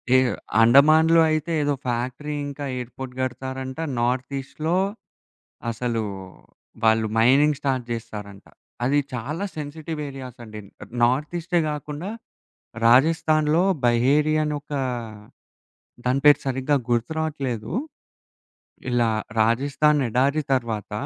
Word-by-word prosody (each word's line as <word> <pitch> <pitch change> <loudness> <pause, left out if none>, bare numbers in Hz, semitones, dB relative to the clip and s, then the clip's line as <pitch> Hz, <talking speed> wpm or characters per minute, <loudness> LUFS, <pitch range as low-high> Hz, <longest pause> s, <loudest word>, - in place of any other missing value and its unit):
ఏహ్! 130 -1 +4 0.3
అండమాన్‌లో 155 +7 +6
అయితే 155 +2 -1
ఏదో 145 0 +1
ఫ్యాక్టరీ 125 +5 -3
ఇంకా 145 0 -6
ఎయిర్‌పోర్ట్ 125 +1 -7
గడతారంట. 130 +1 -4 0.2
నార్త్ 125 +3 -1
ఈస్ట్‌లో 155 +5 -3 0.9
అసలు 115 -1 -2 0.8
వాళ్ళు 110 0 +3
మైనింగ్ 135 +5 +4
స్టార్ట్ 130 -3 -1
చేస్తారంట. 105 -3 -7 0.4
అది 140 +4 +2 0.2
చాలా 150 - -3
సెన్సిటివ్ 150 +1 -6
ఏరియాస్ 130 -2 -9
అండి. 110 -1 -9 0.4
నార్త్ 135 +7 +1
ఈస్టే 170 0 0
కాకుండా, 150 +5 -5 0.8
రాజస్థాన్‌లో 155 +5 +4 0.2
బహేరి 140 +6 +3
అని 150 0 -1
ఒక 150 - -10 1.3
దాని 130 +2 +1
పేరు 145 - +7
సరిగ్గా 135 +2 0
గుర్తు 120 +4 0
రావట్లేదు. 135 -8 -3 1.2
ఇలా 120 -2 +2 0.3
రాజస్థాన్ 140 +6 +2
ఎడారి 140 +6 +1
తర్వాత, 115 -5 -2
135 Hz, 105 wpm, -23 LUFS, 120-150 Hz, 1.3 s, పేరు